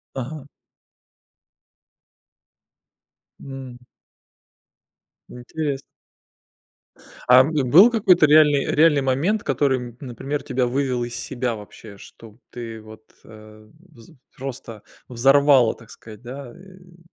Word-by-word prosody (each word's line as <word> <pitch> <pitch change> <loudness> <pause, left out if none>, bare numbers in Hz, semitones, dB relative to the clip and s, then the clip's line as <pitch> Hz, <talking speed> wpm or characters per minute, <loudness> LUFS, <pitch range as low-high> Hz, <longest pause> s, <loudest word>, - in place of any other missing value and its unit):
Ага. 135 +2 -7 3.0
М. 130 -2 -10 1.4
Интересно. 140 +3 -5 1.5
А 125 +1 +8
бы 150 -2 -1
был 180 - +6
какой-то 190 -8 +3
реальный 150 -2 +4
реальный 150 -2 +3
момент, 145 +11 -1
который, 130 -4 -1
например, 135 +3 -5
тебя 130 -2 -1
вывел 125 -1 -2
из 120 0 -8
себя 125 -1 -4
вообще, 105 0 -13
что 110 +2 -16
ты 115 -2 -8
вот, 110 0 -15 0.2
э, 110 0 -16 0.3
вз 115 -2 -17 0.3
просто 125 -5 -8 0.3
взорвало, 135 0 +3
так 115 -1 -18
сказать, 110 0 -14
да, 130 0 -9
э 180 -2 -19
130 Hz, 100 wpm, -21 LUFS, 120-150 Hz, 3.0 s, А